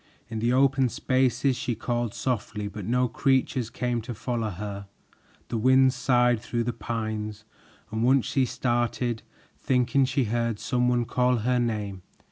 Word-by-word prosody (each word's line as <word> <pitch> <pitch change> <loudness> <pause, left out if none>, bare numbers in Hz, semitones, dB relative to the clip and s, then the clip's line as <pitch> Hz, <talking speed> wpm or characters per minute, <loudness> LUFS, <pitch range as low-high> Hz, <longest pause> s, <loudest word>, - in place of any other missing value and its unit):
In 110 -1 -4
the 120 +2 +1
open 135 0 +3
spaces 130 +1 +1
she 120 -1 -2
called 120 0 -2
softly, 105 -4 -2
but 100 -1 -7
no 125 +2 +2
creatures 130 -1 +1
came 120 0 -2
to 120 +1 -6
follow 115 0 -2
her. 100 +1 -6 0.6
The 115 - -1
wind 130 +2 +5
sighed 125 -2 +3
through 120 0 -2
the 120 +1 -2
pines, 110 -2 -4 0.5
and 110 +1 -1
once 130 +1 +4
she 135 -2 +1
started, 120 -1 -1 0.4
thinking 125 +1 +2
she 130 +1 +1
heard 115 0 -1
some 125 +3 0
one 120 -1 +2
call 125 +1 +2
her 125 0 +2
name. 105 -5 -2
120 Hz, 155 wpm, -26 LUFS, 110-125 Hz, 0.6 s, wind